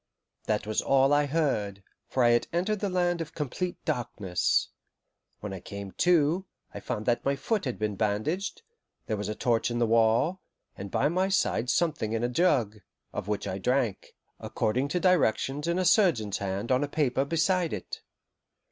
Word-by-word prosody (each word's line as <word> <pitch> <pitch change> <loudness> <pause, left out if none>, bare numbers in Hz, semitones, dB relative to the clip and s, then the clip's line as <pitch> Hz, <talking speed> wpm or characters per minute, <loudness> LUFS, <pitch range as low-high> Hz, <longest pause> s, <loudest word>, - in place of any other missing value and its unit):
That 105 -1 0
was 110 0 0
all 135 +1 +3
I 145 0 +3
heard, 110 -11 -1 0.2
for 130 - +1
I 120 - +5
had 120 0 +2
entered 190 +5 0
the 200 - -1
land 175 -2 0
of 165 -1 -7
complete 165 +5 -3
darkness. 105 -7 0 0.7
When 105 -2 -5
I 95 - -6
came 100 +2 -8
to, 175 - +2 0.3
I - - -6
found 105 - -4
that 120 0 +1
my 140 0 +1
foot 210 +6 -1
had 125 - -3
been 105 -1 -2
bandaged, 115 - -1 0.4
there 110 - -1
was 105 0 -4
a 105 - -3
torch 115 0 +1
in 120 - -2
the 120 - +2
wall, 115 +10 +2 0.3
and 100 +1 -7
by 135 - +1
my 185 +4 +1
side 125 -10 +1
something 145 -7 0
in 115 +1 -1
a 120 - +1
jug, 125 - +1 0.3
of - - -4
which 105 -1 -2
I 95 - -3
drank, 125 -2 -1 0.2
according 125 +6 -1
to 180 +5 -1
directions 150 - +1
in 170 +1 +1
a 185 - +1
surgeon's 165 - +3
hand 100 +4 -3
on 130 +2 +3
a - - -1
paper 135 -3 +1
beside 165 +3 +1
it. 100 - -6
130 Hz, 185 wpm, -28 LUFS, 110-170 Hz, 0.7 s, I